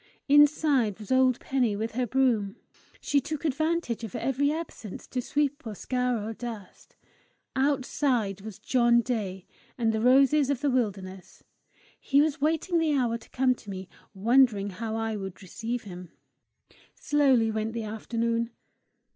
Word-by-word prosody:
Inside 285 -6 +4
was 210 0 -10
old 260 -1 +4
Penny 250 -6 0
with 220 +2 -3
her 250 +2 -1
broom: 230 -5 +1 0.5
she 285 - +2
took 310 +3 -5
advantage 310 -4 -1
of 220 - -6
every 280 +2 0
absence 305 - -6
to 250 - -3
sweep 290 +3 -1
or 220 -4 -6
scour 250 -2 -1
or 225 - -4
dust; 225 -5 -9 0.6
outside 260 -6 0
was 215 -1 -8
John 235 +1 +3
Day, 205 -7 -3 0.3
and 225 -3 +1
the 220 - -1
roses 275 +3 +4
of 280 -3 -1
the 290 -2 +1
wilderness! 195 -6 -3 0.6
He 280 - +2
was 295 -1 +1
waiting 325 +3 +1
the 315 -2 +1
hour 235 -3 0
to - - -18
come 255 0 +2
to 220 - -14
me, 190 -1 -7 0.3
wondering 215 -1 +3
how 220 +3 -4
I 225 -1 -2
would 195 0 -7
receive 225 +6 -4
him! 180 -3 -9 0.9
Slowly 265 -6 +2
went 220 +1 -2
the 230 -1 -3
afternoon. 230 +2 -2
240 Hz, 150 wpm, -27 LUFS, 215-275 Hz, 0.9 s, Inside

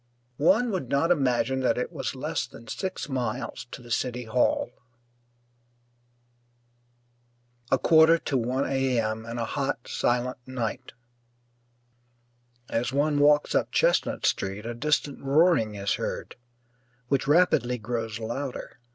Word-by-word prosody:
One 220 +10 +4
would 180 - -3
not 140 +5 +2
imagine 130 -4 +1
that 130 - +1
it 125 - -2
was - - -4
less - - -2
than 115 - -14
six 190 -4 -4
miles 125 -2 -3
to 125 - -9
the 120 - -12
City 125 +1 -1
Hall. 120 +1 +1 3.0
A 135 - +5
quarter 160 +3 +6
to 145 - -3
one 130 +2 0
A. 135 -2 +1
M., 110 0 -2
and 120 +1 -5
a 115 - -1
hot, 135 -2 -3
silent 125 +1 0
night. 130 0 -4 1.7
As 120 +2 -1
one 145 +2 +1
walks 145 0 +4
up - - +1
Chestnut - - +2
Street 100 +3 -1
a 120 - -3
distant 140 +2 -1
roaring 140 -6 +3
is 100 0 -1
heard, - - -4 0.7
which 135 -1 +1
rapidly 140 -6 +3
grows 115 -1 -3
louder. 125 +5 -5
130 Hz, 130 wpm, -26 LUFS, 120-145 Hz, 3.0 s, quarter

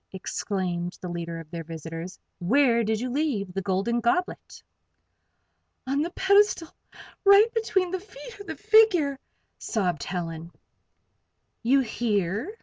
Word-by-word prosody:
exclaimed 180 -2 -3
the 180 - -5
leader 170 -1 -5
of 165 -1 -12
their 170 -1 -5
visitors. 165 +2 -7 0.2
"Where 235 +5 +3
did 220 0 0
you 250 +1 -3
leave 245 -10 -1
the 195 - -2
Golden 195 +5 0
Goblet?" 360 +6 -2 1.2
"On 275 +2 0
the 330 - -1
pedestal, 395 -2 +3 0.5
right 405 +3 +6
between 390 -6 0
the 375 - -2
feet 445 +3 -12
of 405 - -10
the - - -4
figure," 415 -10 +4 0.4
sobbed 180 -8 -1
Helen. 170 -2 -5 1.1
"You 265 +4 +4
hear?" 220 - -1
235 Hz, 130 wpm, -26 LUFS, -, 1.2 s, right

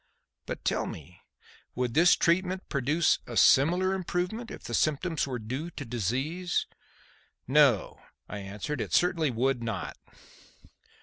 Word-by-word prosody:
But - - -6
tell - - 0
me, 85 +4 -10 0.5
would 125 -1 -1
this 170 +4 +6
treatment 185 +2 +1
produce 145 +4 +2
a - - -5
similar 180 +7 +5
improvement 190 +5 -3
if - - -9
the - - -6
symptoms 155 +1 0
were 130 -2 -3
due 130 +9 -5
to 145 - -8
disease?" 130 - -1 0.8
"No," 135 -6 +3 0.3
I 105 - -6
answered, 100 +9 -5
"it - - -5
certainly 170 -4 +2
would 125 +1 0
not." 115 -5 -4
145 Hz, 130 wpm, -28 LUFS, 120-175 Hz, 0.8 s, this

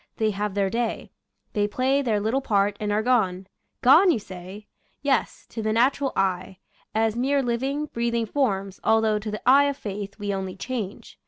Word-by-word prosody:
They 220 -1 +1
have 205 0 -3
their 195 -1 +1
day; 235 -1 -2 0.4
they 205 -2 +1
play 260 +6 +1
their 225 -6 +1
little 225 +6 0
part, 205 -4 +1
and 210 -1 -2
are 210 +1 +1
gone. 195 -7 +1 0.4
Gone, 320 +10 +7
you 330 - +3
say? 190 +1 -9 0.4
Yes, 270 -4 0
to 225 - -5
the 215 0 0
natural 265 +4 +2
eye 190 0 -1 0.2
— - - -34
as 220 0 +2
mere 270 +3 +1
living, 265 +5 -1
breathing 235 -4 -1
forms, 200 -7 -1
although 220 -1 +3
to 215 +1 -5
the 210 +3 -6
eye 275 +2 +7
of 280 -1 -1
faith 200 -3 -6
we 205 -1 -3
only 190 -1 -4
change. 215 -2 -6
220 Hz, 185 wpm, -25 LUFS, 200-255 Hz, 0.4 s, Gone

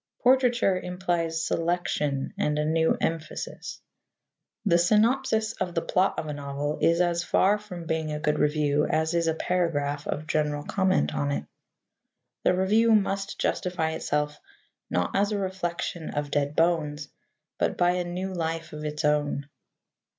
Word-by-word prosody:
Portraiture 245 -6 +4
implies 175 -3 -1
selection 165 -5 -1
and 150 0 0
a 150 - +1
new 160 +1 +2
emphasis. 165 - -4 0.9
The 170 -4 +4
synopsis 220 +3 +2
of 175 -5 -4
the 165 - 0
plot 190 +1 +1
of - - -2
a 150 - -4
novel 145 +1 -3
is 170 +1 +4
as 175 -1 +1
far 200 +3 +3
from 180 -5 -8
being 160 -1 -1
a 150 - -3
good 150 -1 0
review 150 0 +2
as 160 +1 +1
is 170 -1 +1
a 160 - +1
paragraph 150 -5 -1
of 155 - -3
general 150 -2 0
comment 185 - +1
on 70 0 -1
it. 70 +1 -2 1.0
The 180 - +4
review 215 +5 +4
must 195 -1 -1
justify 180 -3 0
itself, 150 -1 -2 0.5
not 90 0 -1
as 200 +2 +2
a 210 - 0
reflection 175 -3 -3
of 145 -1 -3
dead 145 0 0
bones, 155 -3 +1 0.5
but - - 0
by 175 0 +4
a 180 0 0
new 180 +2 -4
life 165 -1 -3
of 150 0 -6
its 150 0 -3
own. 145 -1 +1
165 Hz, 155 wpm, -27 LUFS, 150-185 Hz, 1.0 s, Portraiture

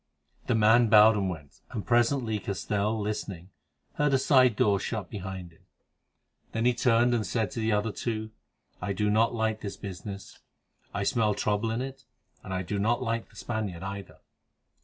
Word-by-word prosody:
The 125 - +2
man 110 +2 +5
bowed 105 +1 +7
and 100 -2 0
went, 75 -5 -9
and 105 - -5
presently 120 -2 +2
Castell, 105 +2 -1
listening, 100 -4 -4 0.5
heard 145 -2 +3
a - - +5
side 130 -3 +4
door 100 -2 +3
shut 105 -4 -4
behind 95 -4 -6
him. 80 - -24 0.9
Then 115 +1 0
he 125 - +4
turned 120 0 +3
and 115 -2 +1
said 110 +1 -1
to 130 - -5
the 110 0 +1
other 105 +1 +1
two: 110 0 -4 0.5
"I 100 - -2
do 105 +2 0
not 115 +3 +3
like 110 -1 -1
this 100 -2 -6
business. 100 0 -8 0.5
I 100 - -2
smell 105 -1 +1
trouble 105 +2 0
in 115 +3 -1
it, 135 -1 -8 0.4
and 95 - -8
I 95 0 -1
do 100 +3 -3
not 120 +5 +1
like 115 -1 -2
the - - -22
Spaniard 105 -6 -4
either." 100 0 -7
110 Hz, 180 wpm, -28 LUFS, 100-115 Hz, 0.9 s, bowed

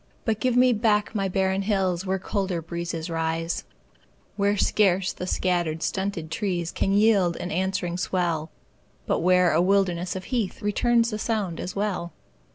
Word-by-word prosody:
But 220 -2 0
give 255 -1 +1
me 250 0 +5
back 210 -1 +1
my 195 -3 0
barren 190 +1 0
hills 190 -3 0
Where 190 +1 +1
colder 190 -2 -2
breezes 170 0 -4
rise; 165 0 -2 0.7
Where 200 0 +1
scarce 195 -2 +2
the 180 - -6
scattered, 175 -4 0
stunted 190 -3 -2
trees 175 -4 -2
Can 195 - 0
yield 200 -4 +3
an 180 - -5
answering 185 -2 -1
swell, 170 -4 -1 0.6
But - - 0
where 180 0 +4
a 160 - +4
wilderness 180 -2 +1
of 185 - -5
heath 230 -5 -2
Returns 235 +3 +2
the 215 - -3
sound 210 -7 -2
as 180 - -5
well. 195 -4 -2
190 Hz, 160 wpm, -25 LUFS, 175-205 Hz, 0.7 s, me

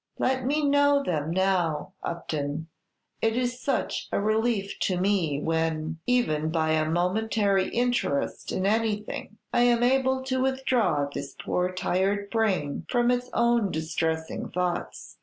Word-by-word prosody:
"Let 260 -1 0
me 295 +1 +1
know 285 0 +4
them 155 - -1
now, 180 -3 0
Upton; 155 -2 -4 0.5
it 225 +1 +1
is 250 0 -1
such 275 - -1
a - - +1
relief 215 -1 0
to 185 -2 0
me 180 -7 +1
when, 160 0 -1
even 160 -12 +1
by 160 -1 +1
a 155 0 +1
momentary 195 +3 +1
interest 240 -12 -1
in 185 - -1
anything, 215 0 -1 0.2
I - - +3
am 240 -1 +4
able 260 +1 +2
to 260 -1 -1
withdraw 245 - +1
this 140 -1 -6
poor 180 0 -1
tired 195 +2 0
brain 190 -11 0
from 240 -1 +3
its 250 0 -1
own 235 -4 +2
distressing 160 0 -2
thoughts." 180 0 -3
200 Hz, 140 wpm, -27 LUFS, 160-245 Hz, 0.5 s, know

